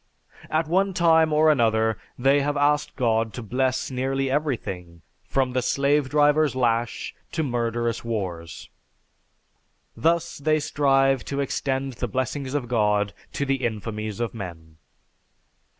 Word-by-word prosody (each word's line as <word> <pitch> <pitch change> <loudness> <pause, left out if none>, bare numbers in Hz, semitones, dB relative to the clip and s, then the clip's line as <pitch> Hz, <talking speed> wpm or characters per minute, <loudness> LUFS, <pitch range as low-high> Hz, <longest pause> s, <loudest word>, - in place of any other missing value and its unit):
At 155 0 0
one 190 +3 +1
time 160 -2 +4
or 155 +1 +5
another, 110 -5 +2 0.2
they 135 +3 +3
have 145 +1 -1
asked 150 +1 +1
God 115 -3 +1
to 125 - -6
bless 130 +4 -1
nearly 135 +1 -1
everything, 95 - -3 0.2
from 130 -2 0
the 130 - +1
slave 140 +2 +1
driver's 150 0 +3
lash 120 -2 0 0.2
to 160 - 0
murderous 120 -3 -1
wars. 90 -8 -5 1.2
Thus 170 0 0
they 155 +2 +2
strive 135 -3 +2
to 140 - -3
extend 135 -1 -1
the 125 +1 -3
blessings 130 +3 -3
of 135 -4 -1
God 105 -3 +1 0.2
to 140 - -1
the 135 0 0
infamies 110 -2 -3
of 120 -2 -2
men. 80 -7 -9
130 Hz, 135 wpm, -24 LUFS, 115-145 Hz, 1.2 s, or